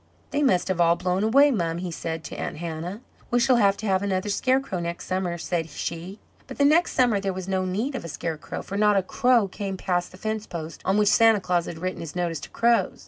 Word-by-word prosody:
"They 290 Hz, -, 0 dB
must 190 Hz, -11 st, +2 dB
have 180 Hz, -2 st, +1 dB
all 170 Hz, 0 st, +5 dB
blown 180 Hz, +2 st, -1 dB
away, 275 Hz, +6 st, +5 dB
mum," 170 Hz, -8 st, -1 dB
he 180 Hz, 0 st, -4 dB
said 165 Hz, 0 st, -4 dB
to -, -, -7 dB
Aunt -, -, -4 dB
Hannah. 170 Hz, +5 st, -5 dB, 0.3 s
"We 245 Hz, -, +2 dB
shall 250 Hz, +1 st, +4 dB
have 200 Hz, -3 st, +3 dB
to 220 Hz, -, -6 dB
have 190 Hz, -2 st, +2 dB
another 195 Hz, 0 st, -1 dB
scarecrow 255 Hz, -2 st, 0 dB
next 170 Hz, 0 st, -4 dB
summer," 185 Hz, -2 st, -2 dB
said 165 Hz, -1 st, -2 dB
she. 170 Hz, +6 st, -5 dB, 0.3 s
But 260 Hz, -, -9 dB
the 280 Hz, -, +4 dB
next 320 Hz, +4 st, +4 dB
summer 245 Hz, -6 st, +3 dB
there 195 Hz, -1 st, -2 dB
was 185 Hz, 0 st, -6 dB
no 190 Hz, -1 st, 0 dB
need 215 Hz, +10 st, -2 dB
of 260 Hz, -, -4 dB
a -, -, -6 dB
scarecrow, 155 Hz, +1 st, -5 dB
for 200 Hz, -, -5 dB
not 210 Hz, -1 st, +4 dB
a 195 Hz, -, +2 dB
crow 245 Hz, +1 st, +2 dB
came 195 Hz, 0 st, -5 dB
past 180 Hz, -1 st, -1 dB
the 185 Hz, -, -13 dB
fence 215 Hz, +1 st, -3 dB
post 165 Hz, -1 st, -7 dB
on 190 Hz, +2 st, +2 dB
which 210 Hz, -1 st, +4 dB
Santa 225 Hz, -1 st, +5 dB
Claus 180 Hz, -2 st, 0 dB
had 165 Hz, -, -6 dB
written 185 Hz, +2 st, -4 dB
his 165 Hz, -1 st, -7 dB
notice 170 Hz, -3 st, -1 dB
to -, -, -9 dB
crows. 235 Hz, 0 st, +1 dB
190 Hz, 245 wpm, -25 LUFS, 175-220 Hz, 0.3 s, all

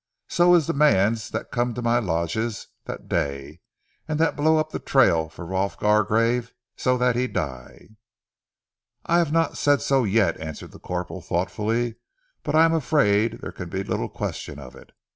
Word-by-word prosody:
So 175 Hz, 0 st, +4 dB
he -, -, +8 dB
is 165 Hz, -, +2 dB
ze -, -, -1 dB
mans 115 Hz, -7 st, +2 dB
dat -, -, -5 dB
come 120 Hz, -1 st, -1 dB
to 125 Hz, -, -4 dB
my 120 Hz, +1 st, +3 dB
lodges 100 Hz, +3 st, -2 dB, 0.2 s
dat -, -, -7 dB
day, 70 Hz, +3 st, -3 dB, 0.5 s
an' 155 Hz, -1 st, -2 dB
dat 165 Hz, +1 st, +1 dB
blow 155 Hz, +2 st, +3 dB
up 155 Hz, 0 st, -1 dB
ze -, -, -4 dB
trail 85 Hz, -, +3 dB
for 85 Hz, +1 st, -10 dB
Rolf 95 Hz, +2 st, -2 dB
Gargrave 115 Hz, +3 st, +1 dB, 0.2 s
so 125 Hz, 0 st, +1 dB
dat 125 Hz, -1 st, +2 dB
he 125 Hz, +1 st, 0 dB
die." 65 Hz, -, -6 dB, 1.2 s
"I 170 Hz, +1 st, +3 dB
have 165 Hz, -4 st, +1 dB
not 165 Hz, -1 st, +1 dB
said 145 Hz, -1 st, +3 dB
so 135 Hz, -2 st, +2 dB
yet," 110 Hz, 0 st, +1 dB
answered 80 Hz, -1 st, -7 dB
the -, -, -14 dB
corporal 90 Hz, +1 st, -5 dB
thoughtfully, 110 Hz, +7 st, -1 dB, 0.4 s
"but -, -, -2 dB
I 160 Hz, +1 st, +7 dB
am 165 Hz, -, +2 dB
afraid 125 Hz, -8 st, +2 dB
that -, -, -11 dB
there -, -, -6 dB
can 90 Hz, -2 st, -8 dB
be 95 Hz, +3 st, -3 dB
little -, -, -3 dB
question 70 Hz, -, -5 dB
of 65 Hz, -3 st, -11 dB
it. -, -, -16 dB
115 Hz, 185 wpm, -24 LUFS, 90-140 Hz, 1.2 s, he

